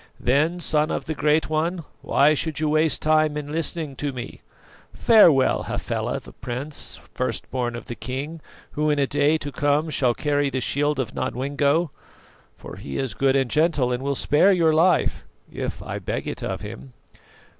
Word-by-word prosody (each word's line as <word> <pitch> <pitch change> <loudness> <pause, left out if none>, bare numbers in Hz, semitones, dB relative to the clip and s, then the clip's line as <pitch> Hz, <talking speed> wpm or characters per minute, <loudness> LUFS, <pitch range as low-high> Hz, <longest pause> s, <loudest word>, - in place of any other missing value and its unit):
"Then, 150 +8 +1
Son 155 -2 +1
of - - -3
the 160 - -2
Great 150 +1 +2
One, 165 +3 -1 0.2
why 145 +3 +4
should 155 0 -2
you 155 -1 0
waste 155 -2 +2
time 155 -1 +3
in 145 -1 -5
listening 160 -2 -2
to 145 -1 -2
me? 125 -1 -8 0.5
Farewell, 170 - +5
Hafela - - -2
the - - -14
Prince, 135 +5 -5
first - - -3
born 120 -2 -2
of 120 - -7
the - - -6
king, 140 +7 -5 0.3
who 150 +1 0
in 150 - +2
a 140 - +3
day 145 +3 +2
to 145 -2 -6
come 145 +3 +1
shall 125 -5 +1
carry 145 -1 0
the 130 -1 -2
shield 145 +3 0
of 120 -5 -2
Nodwengo; 140 +5 0 0.7
for - - -10
he 70 - -6
is 130 -6 -2
good 135 +5 +2
and 135 -3 +1
gentle, 150 -5 +2
and 125 +1 -2
will 140 +1 -1
spare 150 +9 +4
your 165 -4 +3
life 165 +1 +2 0.3
if - - -5
I - - -5
beg - - -4
it - - -5
of - - -3
him." 65 +1 -9
145 Hz, 180 wpm, -23 LUFS, 135-155 Hz, 0.7 s, Farewell